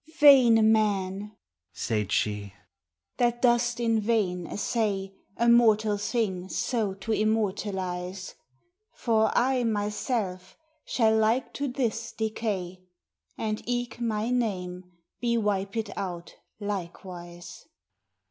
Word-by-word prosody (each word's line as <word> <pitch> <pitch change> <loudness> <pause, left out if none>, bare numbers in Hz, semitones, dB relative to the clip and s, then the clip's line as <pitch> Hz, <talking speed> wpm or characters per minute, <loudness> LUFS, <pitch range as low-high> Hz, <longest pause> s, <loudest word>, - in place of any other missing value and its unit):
Vayne 240 -7 +7
man, 205 -1 0 0.4
say'd 105 -3 -2
she, 105 -2 -1 0.6
that 240 -1 +1
doest 240 -1 +3
in 230 -2 +2
vayne 200 -6 0
assay 200 -3 -1 0.2
A 235 - +1
mortall 220 -3 +5
thing 200 -4 -1
so 215 -5 -1
to 195 +3 -5
immortalize; 190 -4 -1 0.6
For 220 -2 +2
I 255 0 +2
my 210 -3 0
selve 200 -5 -3 0.3
shall 220 -3 +2
like 220 +4 +1
to 285 - -2
this 235 -3 -2
decay, 205 -5 -3 0.6
And 215 -1 -2
eke 245 -1 -2
my 225 0 -1
name 185 -7 -2 0.3
bee 235 -1 +1
wiped 205 0 -1
out 175 -3 -5 0.3
likewise. 175 -3 -7
215 Hz, 105 wpm, -27 LUFS, 190-230 Hz, 0.6 s, Vayne